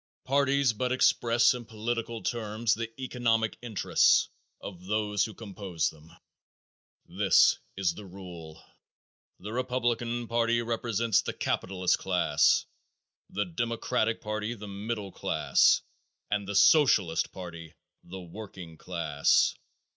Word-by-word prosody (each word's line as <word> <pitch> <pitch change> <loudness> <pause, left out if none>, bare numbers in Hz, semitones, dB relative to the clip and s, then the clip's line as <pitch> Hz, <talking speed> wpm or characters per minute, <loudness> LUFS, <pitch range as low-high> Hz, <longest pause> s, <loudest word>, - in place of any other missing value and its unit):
Parties 140 -1 +2
but 125 +3 -2
express 120 -2 +3
in 125 -1 -6
political 115 +1 -4
terms 110 -1 -1
the 115 +1 -3
economic 115 -4 0
interests 115 -4 +3 0.3
of 90 -2 -9
those 105 -1 0
who 110 - -9
compose 100 -6 -3
them. 80 +1 -18 0.9
This - - +4 0.2
is 95 -3 +1
the 100 +3 -10
rule. 85 -4 -11 0.7
The 105 +4 -8
Republican 120 -1 -1
party 115 0 +1
represents 115 -1 0
the - - -4
capitalist 95 -1 0
class, 90 -2 +2 0.6
the 105 +1 -2
Democratic 115 +3 -1
party 105 +2 -3
the 105 -1 -9
middle 100 0 -5
class - - +2 0.5
and 100 -1 -1
the 100 - -4
Socialist 100 - +4
party 85 -3 -9 0.3
the 95 +2 -9
working 90 -2 -10
class. 80 -5 +2
105 Hz, 115 wpm, -28 LUFS, 95-115 Hz, 0.9 s, This